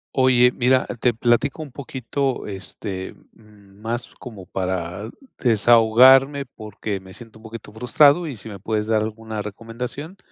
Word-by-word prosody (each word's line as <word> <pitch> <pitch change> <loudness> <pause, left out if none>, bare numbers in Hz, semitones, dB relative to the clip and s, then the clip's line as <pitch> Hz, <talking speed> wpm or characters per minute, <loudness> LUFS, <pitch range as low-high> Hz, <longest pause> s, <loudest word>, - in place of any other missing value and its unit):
Oye, 125 -2 +5
mira, 130 +1 +2
te 125 - +2
platico 120 +6 +1
un 145 - -11
poquito. 135 0 -3
Este, 95 -1 -6 0.2
más 105 +2 -8
como 110 -7 -10
para 95 +2 -4 0.3
desahogarme, 125 +5 +5
porque 105 -4 -6
me 95 0 -14
siento 115 -1 -13
un 110 - -19
poquito 110 -1 -10
frustrado, 140 +9 +3
y 140 - -5
si 110 +1 -11
me 100 -2 -9
puedes 105 +2 -2
dar 110 -1 +2
alguna 110 0 -5
recomendación, 115 - -7
115 Hz, 140 wpm, -22 LUFS, 105-125 Hz, 0.3 s, Oye